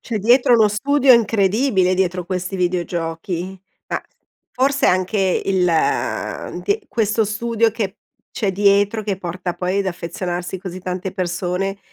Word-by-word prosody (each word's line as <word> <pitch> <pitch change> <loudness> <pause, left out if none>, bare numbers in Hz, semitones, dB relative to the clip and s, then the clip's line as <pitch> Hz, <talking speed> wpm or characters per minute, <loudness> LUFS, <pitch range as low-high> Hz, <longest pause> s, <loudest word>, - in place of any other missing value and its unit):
C'è 225 -3 -3
dietro 245 +5 +4
uno 220 -2 +5
studio 270 +5 +3
incredibile, 205 -3 +3
dietro 180 -1 0
questi 185 +1 -3
videogiochi, 175 +1 -3 0.3
ma - - -2 0.5
forse 270 +2 +2
anche 185 +1 +1
il 180 -4 0
ti 415 +2 0
questo 220 -1 +1
studio 230 +2 0
che 205 -3 -3 0.3
c'è 205 -6 -1
dietro 205 +2 +3
che 200 -3 -2
porta 175 -1 -4
poi 185 +2 -1
ad 195 - 0
affezionarsi 175 +1 -4
così 185 0 -7
tante 185 +1 -4
persone 185 +1 -2
190 Hz, 130 wpm, -20 LUFS, 180-220 Hz, 0.5 s, uno